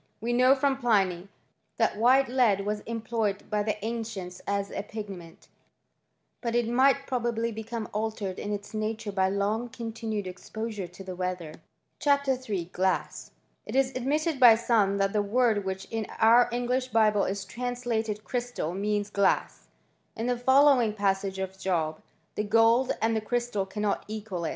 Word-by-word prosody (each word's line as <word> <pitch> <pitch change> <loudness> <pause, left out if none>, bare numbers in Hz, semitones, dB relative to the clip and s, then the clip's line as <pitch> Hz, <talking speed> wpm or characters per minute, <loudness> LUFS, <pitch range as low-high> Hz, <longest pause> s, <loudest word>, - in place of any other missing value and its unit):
* - - -44
We - - +2
know 255 +2 +5
from 275 0 +1
Pliny 195 -7 +1 0.5
that - - +2
white 255 +5 +4
lead 235 -6 +2
was 210 0 -1
employed 225 -3 -2
by 210 0 +1
the 210 0 -1
ancients 220 -6 -5
as 200 0 -1
a - - -3
pigment; 195 -6 -9 0.9
but 235 -1 -2
it 240 -1 +2
might 270 +3 +3
probably 235 -3 -1
become 225 0 -5
altered 210 -3 -3
in 205 - -4
its 205 0 -5
nature 215 0 -3
by 190 -1 +1
long 205 +5 -1
continued 225 -3 -4
exposure 205 +2 -5
to 180 +3 -12
the 185 -1 -6
weather. 180 -3 -4 0.5
Ill, 260 - +1
— 175 - -24
GLASS. 185 0 -1 0.4
It - - -5
is 265 -1 +3
admitted 290 +4 0
by 240 -4 +9
some 220 -4 +2
that 195 0 +1
the 210 - +2
word 215 -1 +1
which 190 0 -4
in 225 -2 -2
our 235 +2 +6
English 245 +2 -1
Bible 215 -4 +3
is 195 +1 -3
translated 235 -3 -3
crystal, 245 -10 -3
means 205 +1 -1
glass, 200 -1 0 0.5
in 225 - -3
the 245 0 +1
following 260 -3 +4
passage 195 -1 0
of 190 0 -5
Job: 160 -5 -1 0.2
*' 160 - -42
The 210 - -2
gold 225 +4 +4
and 225 0 +2
the 220 - 0
crystal 240 -3 -1
cannot 210 +1 -2
equal 205 -5 -5
it." - - -1
220 Hz, 165 wpm, -28 LUFS, 200-240 Hz, 0.9 s, by